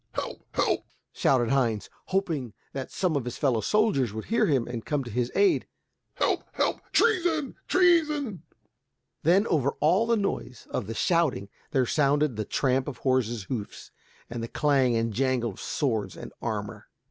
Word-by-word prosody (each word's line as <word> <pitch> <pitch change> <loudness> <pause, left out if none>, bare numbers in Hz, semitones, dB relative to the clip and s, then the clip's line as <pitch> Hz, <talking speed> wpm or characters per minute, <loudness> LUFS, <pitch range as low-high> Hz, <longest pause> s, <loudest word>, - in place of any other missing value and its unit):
"Help! - - -4 0.2
help!" - - +1 0.3
shouted 120 -3 +2
Heinz, 120 -6 +1 0.2
hoping 165 - -1 0.2
that 135 -1 -4
some 180 -5 0
of 140 - 0
his 125 0 -5
fellow 125 -6 +1
soldiers 210 - +2
would 110 - -5
hear 230 - +2
him 135 -6 +1
and 120 -2 -5
come 145 -2 -1
to 120 - -8
his 120 +2 -1
aid, 400 -3 +3 0.5
"Help, - - +1
help! - - 0
treason, 345 - +2
treason!" 305 - +3 0.8
Then 185 +6 +4
over 140 - +1
all 185 +9 +3
the 230 -1 +3
noise 195 - -3
of 110 - -2
the 115 - -5
shouting 160 - +1 0.2
there 130 -2 +2
sounded 145 0 +2
the 110 0 -3
tramp 130 +2 +1
of 140 -5 -5
horses' 120 -5 0
hoofs 105 0 -6 0.4
and 120 0 -5
the 115 - -3
clang 135 -3 +2
and 115 -1 0
jangle 125 -1 +1
of 95 - -11
swords 110 -9 -1
and - - -9
armor. - - -4
135 Hz, 165 wpm, -27 LUFS, 120-185 Hz, 0.8 s, Then